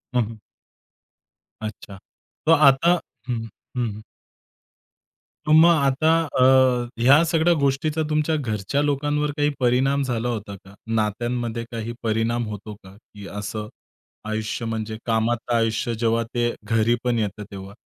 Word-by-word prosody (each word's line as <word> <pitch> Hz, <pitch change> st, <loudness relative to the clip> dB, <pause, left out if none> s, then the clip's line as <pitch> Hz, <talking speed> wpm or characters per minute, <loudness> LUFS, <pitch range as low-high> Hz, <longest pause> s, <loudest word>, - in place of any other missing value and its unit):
हं, 125 Hz, -, +4 dB
हं. 110 Hz, +1 st, -8 dB, 1.2 s
अच्छा. 105 Hz, -2 st, -7 dB, 0.5 s
तर 160 Hz, -, +4 dB
आता 150 Hz, +2 st, +5 dB, 0.4 s
हं, 125 Hz, -, 0 dB
हं, 115 Hz, 0 st, -5 dB, 0.3 s
हं, 120 Hz, -2 st, +1 dB
हं. 110 Hz, -, -11 dB, 1.4 s
तर -, -, +2 dB
मग 160 Hz, +2 st, +8 dB
आता 140 Hz, +2 st, +2 dB, 0.3 s
अ, -, -, +6 dB, 0.6 s
ह्या 140 Hz, +7 st, +6 dB
सगळ्या 165 Hz, +1 st, +3 dB
गोष्टीचा 140 Hz, +3 st, 0 dB
तुमच्या 155 Hz, +1 st, +1 dB
घरच्या 120 Hz, 0 st, -1 dB
लोकांवर 145 Hz, +1 st, 0 dB
काही 145 Hz, 0 st, +2 dB
परिणाम 130 Hz, +3 st, +2 dB
झाला 120 Hz, -2 st, -2 dB
होता 105 Hz, -4 st, -4 dB
का? 95 Hz, +1 st, -16 dB
नात्यांमध्ये 115 Hz, +2 st, -1 dB
काही 115 Hz, 0 st, -4 dB
परिणाम 115 Hz, +1 st, 0 dB
होतो 105 Hz, +1 st, -7 dB
का, 95 Hz, 0 st, -14 dB
की 100 Hz, -1 st, -13 dB
असं 105 Hz, +1 st, -5 dB, 0.6 s
आयुष्य 110 Hz, +1 st, -3 dB
म्हणजे 110 Hz, -1 st, -4 dB
कामात 115 Hz, +1 st, 0 dB
आयुष्य 115 Hz, 0 st, 0 dB
जेव्हा 115 Hz, +1 st, +1 dB
ते 120 Hz, -1 st, 0 dB
घरी 115 Hz, +2 st, +2 dB
पण 120 Hz, -2 st, +1 dB
येतं 105 Hz, 0 st, -3 dB
तेव्हा? 95 Hz, 0 st, -9 dB
115 Hz, 140 wpm, -23 LUFS, 110-140 Hz, 1.4 s, मग